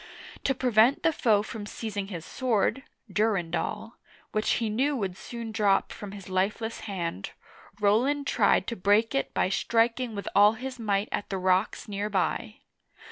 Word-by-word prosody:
To 270 Hz, -, +2 dB
prevent 245 Hz, +1 st, +3 dB
the 325 Hz, -, +3 dB
foe 215 Hz, -7 st, +3 dB
from 215 Hz, -1 st, -7 dB
seizing 205 Hz, -3 st, -4 dB
his 170 Hz, -5 st, -7 dB
sword 255 Hz, 0 st, 0 dB, 0.3 s
("Durendal"), 210 Hz, +1 st, -1 dB, 0.3 s
which 215 Hz, 0 st, +1 dB
he 230 Hz, -, 0 dB
knew 265 Hz, +7 st, +1 dB
would 195 Hz, -7 st, -2 dB
soon 230 Hz, +3 st, -7 dB
drop 210 Hz, -3 st, +2 dB
from 205 Hz, -1 st, -8 dB
his 200 Hz, -2 st, -10 dB
lifeless 200 Hz, +4 st, -1 dB
hand, 170 Hz, -, -4 dB, 0.5 s
Roland 250 Hz, +8 st, +2 dB
tried 205 Hz, -7 st, +3 dB
to 235 Hz, -, -3 dB
break 205 Hz, +4 st, +2 dB
it 275 Hz, -, -1 dB
by -, -, +2 dB
striking 230 Hz, +3 st, +1 dB
with 200 Hz, -, -5 dB
all 205 Hz, +1 st, +7 dB
his 255 Hz, +2 st, -7 dB
might 205 Hz, -2 st, 0 dB
at 205 Hz, -, -3 dB
the 195 Hz, -, -2 dB
rocks 185 Hz, +4 st, +1 dB
near 205 Hz, 0 st, -3 dB
by. 205 Hz, +2 st, -1 dB
215 Hz, 160 wpm, -27 LUFS, 200-235 Hz, 0.5 s, all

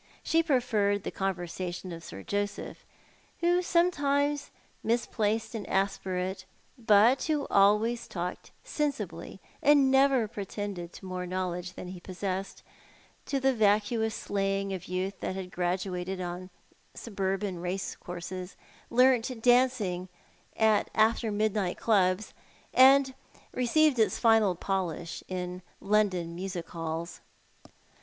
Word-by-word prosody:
She 330 Hz, -, +3 dB
preferred 225 Hz, -, +1 dB
the -, -, -4 dB
conversation 180 Hz, -1 st, -4 dB
of 165 Hz, 0 st, -8 dB
Sir 95 Hz, -, -9 dB
Joseph, 205 Hz, 0 st, -3 dB, 0.6 s
who 350 Hz, +1 st, +3 dB
sometimes 290 Hz, -5 st, +1 dB, 0.3 s
misplaced 225 Hz, -1 st, 0 dB
an 220 Hz, -3 st, -5 dB
aspirate, 190 Hz, -1 st, -1 dB, 0.3 s
but 230 Hz, +1 st, +4 dB
who 300 Hz, -3 st, 0 dB
always 210 Hz, +4 st, +3 dB
talked 180 Hz, 0 st, -5 dB
sensibly, 210 Hz, -, -3 dB, 0.2 s
and 285 Hz, -2 st, +5 dB
never 265 Hz, -4 st, +4 dB
pretended 200 Hz, -4 st, -5 dB
to -, -, -11 dB
more 180 Hz, -1 st, -4 dB
knowledge 180 Hz, -1 st, -3 dB
than 180 Hz, -, -8 dB
he 185 Hz, -1 st, -8 dB
possessed, 190 Hz, +1 st, -5 dB, 0.6 s
to 275 Hz, -, 0 dB
the 265 Hz, 0 st, +3 dB
vacuous 220 Hz, +1 st, +2 dB
slang 195 Hz, 0 st, -1 dB
of 185 Hz, -, -5 dB
youth 185 Hz, +2 st, -3 dB
that 185 Hz, -, -3 dB
had 185 Hz, -1 st, -6 dB
graduated 180 Hz, +1 st, -2 dB
on 180 Hz, +1 st, -5 dB, 0.5 s
suburban 195 Hz, -3 st, -3 dB
racecourses, 180 Hz, 0 st, -5 dB, 0.3 s
learnt 250 Hz, -1 st, +3 dB
dancing 240 Hz, -8 st, +2 dB, 0.5 s
at 220 Hz, -1 st, +3 dB
after 220 Hz, +1 st, +3 dB
midnight 205 Hz, -3 st, 0 dB
clubs, 195 Hz, -2 st, +2 dB, 0.4 s
and 265 Hz, +1 st, +6 dB, 0.4 s
received 260 Hz, +2 st, +3 dB
its 220 Hz, -, +3 dB
final 225 Hz, -5 st, +4 dB
polish 175 Hz, -3 st, -3 dB
in 180 Hz, 0 st, -4 dB, 0.2 s
London 195 Hz, -5 st, +1 dB
music 180 Hz, -1 st, -5 dB
halls. 165 Hz, 0 st, -5 dB
200 Hz, 115 wpm, -29 LUFS, 185-235 Hz, 0.6 s, and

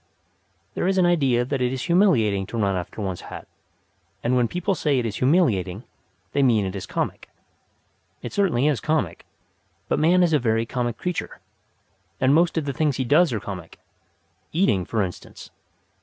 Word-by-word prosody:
There -, -, -1 dB
is 190 Hz, 0 st, +1 dB
an 185 Hz, -, +4 dB
idea 135 Hz, -9 st, +2 dB
that 135 Hz, 0 st, -2 dB
it 125 Hz, 0 st, +1 dB
is 130 Hz, 0 st, -3 dB
humiliating 120 Hz, -, +2 dB
to 115 Hz, -, -6 dB
run 100 Hz, -3 st, +1 dB
after 90 Hz, +4 st, -5 dB
one's 95 Hz, -2 st, -4 dB
hat; -, -, -9 dB, 0.8 s
and 120 Hz, +2 st, +1 dB
when 125 Hz, -2 st, +3 dB
people 180 Hz, -, -1 dB
say 150 Hz, -6 st, 0 dB
it 125 Hz, -, 0 dB
is 105 Hz, -3 st, -3 dB
humiliating 120 Hz, -, +1 dB, 0.5 s
they 140 Hz, -, +1 dB
mean 115 Hz, -6 st, +3 dB
that 95 Hz, -, -2 dB
it 95 Hz, -, -8 dB
is 95 Hz, -, -6 dB
comic. -, -, -4 dB, 0.9 s
It -, -, -6 dB
certainly 175 Hz, -11 st, +1 dB
is 150 Hz, -6 st, +2 dB
comic; 155 Hz, -, -2 dB, 0.6 s
but -, -, 0 dB
man 175 Hz, +4 st, +4 dB
is 170 Hz, -2 st, +2 dB
a 150 Hz, -, +4 dB
very 115 Hz, -2 st, +1 dB
comic 120 Hz, -1 st, -3 dB
creature, 180 Hz, -1 st, -4 dB, 0.8 s
and 130 Hz, +1 st, +3 dB
most 165 Hz, +1 st, +3 dB
of 160 Hz, -, 0 dB
the 140 Hz, -, -2 dB
things 145 Hz, -1 st, 0 dB
he 130 Hz, -, -1 dB
does 155 Hz, +5 st, +4 dB
are 110 Hz, -, -1 dB
comic 90 Hz, -4 st, -8 dB, 0.7 s
eating, 130 Hz, -, +1 dB
for 110 Hz, +2 st, 0 dB
instance. 90 Hz, -2 st, -8 dB
130 Hz, 185 wpm, -23 LUFS, 110-160 Hz, 0.9 s, an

